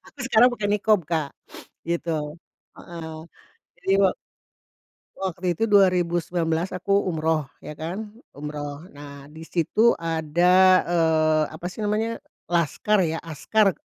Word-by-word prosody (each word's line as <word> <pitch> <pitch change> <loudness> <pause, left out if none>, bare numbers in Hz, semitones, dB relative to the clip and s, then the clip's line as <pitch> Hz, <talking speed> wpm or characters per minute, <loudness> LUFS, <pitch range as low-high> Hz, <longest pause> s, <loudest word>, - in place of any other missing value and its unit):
Aku - - -19
sekarang 240 -1 +6
pakai 210 -4 -2
niqab, 210 0 +3
Kak, 160 -4 -1 0.6
gitu, 170 0 -2
heeh. 150 -1 -4 1.4
Jadi - - -4
wak 190 -2 +3 1.0
waktu 180 -2 -2
itu 225 - +1
2019 175 -4 +2
aku 195 +2 -2 0.2
umroh 160 -4 0 0.2
ya - - -6
kan, 180 +8 -6 0.2
umroh. 145 +1 -6
Nah, 140 -1 -11
di 160 +1 -11
situ 215 +7 +2
ada, 165 +1 +1 0.3
eee, 160 -2 +2
apa 175 - -7
sih - - -9
namanya, 215 +2 -1 0.3
laskar 175 +5 +1
ya, 165 -3 0
askar 190 +6 +1
170 Hz, 120 wpm, -24 LUFS, 155-200 Hz, 1.4 s, sekarang